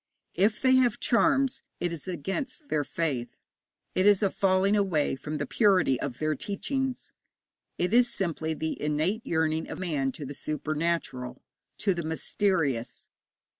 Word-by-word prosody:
If 210 +4 +2
they 260 0 +5
have 245 -4 +3
charms, 270 +2 +2 0.2
it 175 -1 -1
is 165 0 -7
against 195 - -4
their 150 -1 +1
faith; 135 -6 -2 0.6
it 185 +2 +3
is 205 0 +5
a 195 - +3
falling 195 +1 +3
away 185 -10 +1
from 150 +3 -5
the 145 - -2
purity 185 - +3
of 130 -4 -3
their 155 +1 0
teachings; 260 - -3 0.7
it 180 +4 0
is 240 0 +5
simply 160 -6 -2
the 160 +1 -3
innate 155 +9 0
yearning 160 -1 0
of - - -5
man 150 -7 -1
to 145 - -7
the 140 - -6
supernatural, 155 -3 -2 0.3
to 195 - +1
the 170 - -3
mysterious. 160 - -1
170 Hz, 150 wpm, -28 LUFS, 150-205 Hz, 0.7 s, they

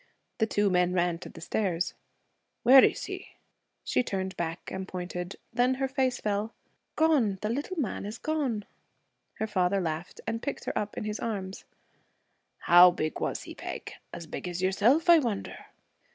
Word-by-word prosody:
The 220 - +3
two 205 -2 +1
men 180 0 +2
ran 175 -2 +1
to - - -9
the 165 - -12
stairs. 175 -1 -1 0.7
'Where 260 +2 +9
is - - +2
he?' - - -7 0.5
She - - +1
turned 190 -5 -3
back 165 0 -4
and 190 0 -5
pointed. 180 0 -5 0.2
Then 245 +2 +3
her 270 +1 -1
face 260 -2 0
fell. 210 +2 -2 0.4
'Gone! 285 -11 +3
the 210 - 0
little 290 +9 -3
man 230 -7 -2
is 215 +3 -6
gone!' 270 -10 -1 0.7
Her 220 - -3
father 195 -2 +1
laughed 165 -1 -4
and 225 0 -2
picked 280 - -4
her - - -3
up 210 0 -3
in - - -3
his 210 0 -3
arms. 195 -4 -4 1.0
'How 175 +1 +8
big 155 -3 -3
was - - -2
he, - - -9
Peg? - - -7 0.2
As 170 -1 -7
big 160 - -6
as 175 0 -4
yourself, 205 - +3
I 340 -1 +8
wonder?' 230 -8 -4
205 Hz, 170 wpm, -28 LUFS, 180-245 Hz, 1.0 s, Where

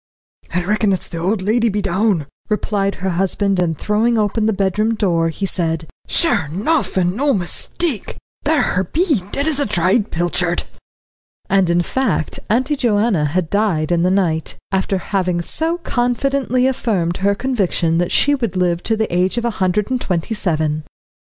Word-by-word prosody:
"I 180 - +1
reckon 210 +1 +1
it's 185 - -1
the 170 - -6
old 190 +3 0
lady 230 +3 +2
be 210 0 -1
down," 195 -4 +1 0.2
replied 205 -2 0
her 190 - +1
husband, 195 +2 0
and, 165 -3 0
throwing 225 +5 +1
open 215 +1 +1
the - - +3
bedroom 210 +3 0
door, 170 -6 +1
he 195 +5 -3
said: 165 -4 -2 0.2
"Sure 330 - +3
enough, 200 - -1
and 180 0 +1
no 280 +2 +2
mistake 215 - -2 0.3
there 305 +1 +2
her 185 - +1
be, 305 - +1
dead 280 - -1
as 310 -3 +1
a 285 - +2
dried 195 +3 +1
pilchard." 175 +1 0 0.9
And 195 -3 +3
in 175 0 +2
fact 260 -7 -1
Auntie 260 +7 +1
Joanna 210 - +2
had 165 +2 -1
died 190 -7 +1
in 170 -1 +2
the 180 - +3
night, 175 -5 0 0.2
after 190 0 0
having 185 -2 -1
so 325 - -1
confidently 255 -2 0
affirmed 210 -10 0
her 200 +1 +1
conviction 195 -9 0
that 175 - 0
she 290 - +3
would 230 -9 -2
live 175 -2 +1
to 225 - -1
the 220 -5 -1
age 185 +5 +1
of 240 - -1
a 235 - +1
hundred 190 +5 +1
and 255 -1 0
twenty 180 +3 -2
seven. 155 -6 -1
195 Hz, 175 wpm, -18 LUFS, 175-235 Hz, 0.9 s, the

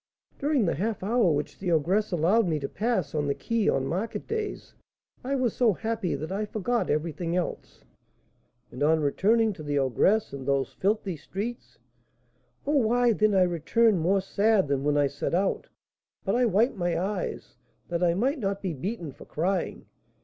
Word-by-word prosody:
During 285 -5 +2
the 170 - +1
half 210 +4 -2
hour 225 -1 +3
which 150 0 -2
the 185 -2 -1
ogress 185 +7 +1
allowed 185 +6 +3
me 155 -3 0
to 140 - -2
pass 215 - -1
on 150 -2 0
the 140 - 0
quay 230 -3 0
on 135 - +1
market 190 +10 -3
days, 435 -2 -4 0.5
I 270 +2 -1
was 255 -5 +1
so 235 -4 +3
happy 220 -3 -2
that 155 +3 -5
I 205 +2 -1
forgot 220 +3 -1
everything 165 +3 -1
else." 180 -1 -4 0.9
"And 125 - -9
on 155 +2 +3
returning 215 +9 +2
to 175 - -11
the 145 -1 -2
ogress, 140 - +2
and 135 -1 -7
those 140 -1 0
filthy 195 -3 -1
streets?" 220 - -6 0.9
"Oh, 290 +1 +2
why, 240 -1 +3
then 215 -1 +2
I 190 - +5
returned 180 +5 +2
more 190 +4 +2
sad 200 -1 +2
than 140 -1 0
when 145 0 +2
I 145 - +4
set 140 +4 -2
out; 195 +2 0 0.6
but 195 - +1
I 245 +1 +3
wiped 220 +5 +2
my 175 -2 0
eyes, 200 +3 -4 0.3
that 170 0 -2
I 170 -1 +3
might 265 - 0
not 200 -3 -1
be 185 -3 -1
beaten 170 - -4
for - - -14
crying. 180 +3 -2
190 Hz, 180 wpm, -27 LUFS, 160-225 Hz, 0.9 s, I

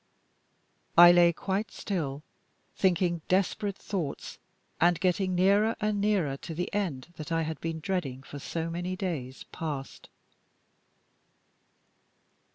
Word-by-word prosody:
I 175 0 +11
lay 175 -1 +6
quite 195 +5 -2
still, 150 -7 -4 0.5
thinking 175 -2 +1
desperate 195 +1 0
thoughts, 170 -8 -4 0.4
and 175 0 +4
getting 185 0 +1
nearer 200 +5 +3
and 210 -1 0
nearer 190 -10 +1
to 165 - -7
the 180 +2 -3
end 175 -10 -2
that 155 +1 -7
I 165 0 +1
had 160 0 -5
been 165 -1 -3
dreading 155 -7 -3
for 145 - -9
so 165 +3 -4
many 175 +2 -3
days 155 -9 -4
past. 150 -5 -6
175 Hz, 120 wpm, -29 LUFS, 160-190 Hz, 0.5 s, I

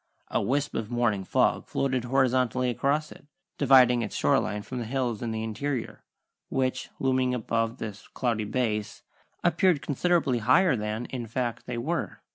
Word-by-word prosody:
A - - +1
wisp 140 +7 0
of 110 -1 -3
morning 120 -5 +1
fog - - +1
floated 130 -3 -1
horizontally 125 -1 +2
across 145 +5 0
it, - - -14 0.3
dividing 125 -3 +6
its 105 - -4
shore - - +3
line 105 0 -3
from 130 +3 -5
the 120 - -3
hills 120 -2 -2
in 120 - -2
the 110 0 -3
interior, 120 +3 -4 0.5
which, 130 -1 -1
looming 130 -1 +1
above 115 0 -1
this 105 -2 -7
cloudy 115 -4 -1
base, 105 -2 -2 0.4
appeared 175 -3 +3
considerably 145 -2 +1
higher 130 +8 +4
than, 105 +2 -3
in 120 -3 -5
fact, 120 +1 -3
they 125 -1 -3
were. 160 +9 -3
125 Hz, 160 wpm, -27 LUFS, 115-135 Hz, 0.5 s, dividing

